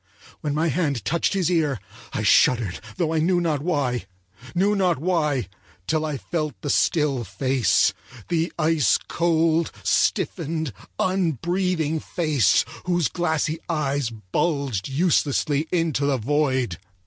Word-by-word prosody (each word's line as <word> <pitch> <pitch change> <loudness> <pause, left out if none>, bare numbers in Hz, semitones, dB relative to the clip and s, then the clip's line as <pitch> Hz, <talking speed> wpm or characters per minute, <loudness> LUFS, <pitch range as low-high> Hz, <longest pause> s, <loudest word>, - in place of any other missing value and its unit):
When 150 -1 -2
my 160 +2 +1
hand 145 -5 -1
touched 170 +3 +1
his 185 -3 +1
ear 150 - +1 0.3
I - - -2
shuddered, 115 -8 +3 0.2
though 165 -2 0
I 160 - +1
knew 175 +3 +2
not 160 -5 0
why—knew 125 - -2
not 185 -4 +2
why 150 - 0 0.4
till 155 0 0
I 150 -2 -3
felt 155 0 -3
the 145 - 0
still 145 -6 +2
face; 130 -3 +2 0.3
the 165 0 0
ice 155 -3 +3
cold, 165 -1 +1
stiffened, 160 -4 0 0.2
unbreathing 175 -2 0
face 150 - +2 0.2
whose 175 -4 +1
glassy 160 -2 -1
eyes 145 -5 0
bulged 115 - -2
uselessly 145 0 +1
into 160 -5 +1
the 140 -2 +2
void. 130 - 0
155 Hz, 125 wpm, -23 LUFS, 135-170 Hz, 0.4 s, shuddered